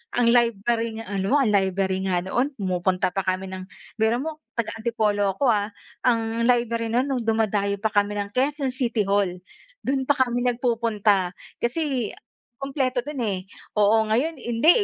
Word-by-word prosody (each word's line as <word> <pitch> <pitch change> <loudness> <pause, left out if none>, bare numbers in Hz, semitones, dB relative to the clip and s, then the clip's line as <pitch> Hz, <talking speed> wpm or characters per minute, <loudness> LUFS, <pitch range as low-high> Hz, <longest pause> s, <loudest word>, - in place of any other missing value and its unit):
Ang 240 -1 +4
library 230 -1 +2
nga 225 -1 -7
ano 195 +8 +1
ang 270 -7 +3
library 190 -1 +1
nga 180 -2 +1
noon 240 +8 +1
pumupunta 185 -3 0
pa 195 - -2
kami 185 0 -2
ng 185 0 -7 0.3
biro 220 +1 +3
mo, 310 +1 -5 0.2
taga 235 -2 -1
Antipolo 210 -4 +1
ako, 270 +4 +2
ah. 205 -2 +1 0.4
Ang 230 -1 +1
library 235 -2 +2
no'n, 240 +3 +2
no'ng 265 -4 -2
dumadayo 210 -2 +1
pa 220 - +1
kami 205 -1 +1
ng 200 0 -3
Quezon 270 +3 0
City 240 -4 0
Hall. 195 -2 0 0.4
Do'n 265 -1 -1
pa 285 - +4
kami 250 -3 +1
nagpupunta. 225 -6 +1 0.2
Kasi 255 -2 -1 0.5
kumpleto 265 -3 -1
do'n, 295 -2 -6
eh, 200 -4 -1 0.4
oo. 215 +1 +4
Ngayon, 270 +8 0
hindi, 240 +6 +2
225 Hz, 160 wpm, -24 LUFS, 200-245 Hz, 0.5 s, Ang